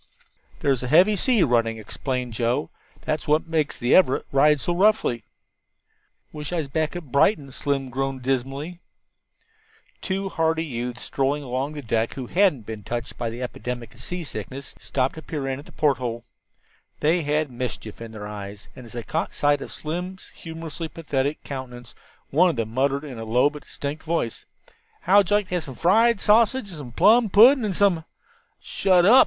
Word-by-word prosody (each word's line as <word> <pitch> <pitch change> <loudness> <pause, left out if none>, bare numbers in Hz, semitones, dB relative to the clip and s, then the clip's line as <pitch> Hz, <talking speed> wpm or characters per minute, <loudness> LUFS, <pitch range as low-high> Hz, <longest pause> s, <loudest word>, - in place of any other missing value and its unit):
"There's 135 -3 +2
a 125 - -3
heavy 180 +10 +5
sea 230 -1 +3
running," 115 -2 +2
explained 125 +2 -4
Joe; 115 -6 0 0.3
"that's 155 0 -2
what 150 +1 +3
makes 160 -3 -1
the 120 - +1
Everett 160 -8 +4
ride 150 +2 +4
so 175 +5 -1
roughly." 185 - +2 1.1
"Wish 150 0 -6
I - - -1
was 160 -4 -1
back 155 +4 -1
at 165 -7 -7
Brighton," 140 -1 +3
Slim 135 -1 -2
groaned 135 0 -2
dismally. 135 +6 -2 1.2
Two 195 +1 -2
hardy 160 -1 0
youths 120 -3 -5
strolling 140 +2 -1
along 130 +3 -2
the 145 -2 -7
deck, 115 -1 0
who 130 - -5
hadn't 165 - +2
been 110 -1 -6
touched 120 +3 -5
by 115 - -1
the 120 +3 -5
epidemic 125 -1 -5
of 120 - -15
seasickness, 140 - -6
stopped 130 -1 -1
to 160 - -9
peer 150 -4 -4
in 135 0 -2
at 145 - -12
the - - -14
porthole. 125 -6 0 0.8
They 165 +3 +2
had 150 -1 0
mischief 120 -3 -5
in 115 -1 -7
their 105 -2 -7
eyes, 100 -1 -8
and 125 - -11
as - - -13
they 120 -1 -5
caught 160 +7 -3
sight 145 -1 +2
of - - -7
Slim's 180 +4 -5
humorously 165 0 -7
pathetic 145 -3 -2
countenance, 125 -3 -7 0.4
one 180 +6 +5
of 170 - -1
them 115 -2 -3
muttered 140 +3 +1
in 130 -6 -7
a - - -5
low 125 +6 +3
but 150 -1 -11
distinct 145 +2 -5
voice: 160 -8 -2 0.6
"How'd 195 0 +4
you 205 - +4
like 205 -2 0
to - - -5
have 165 - -4
some 135 - -8
fried 220 - +4
sausage, 225 +2 +3
and 175 - -8
some 130 -4 -8
plum 220 - +5
pudding, 240 +7 +7
and 195 -3 -1
some 190 -5 +3 0.3
" 470 - -39
"Shut 185 -2 +2
up!" 240 +7 +8
145 Hz, 185 wpm, -24 LUFS, 125-170 Hz, 1.2 s, up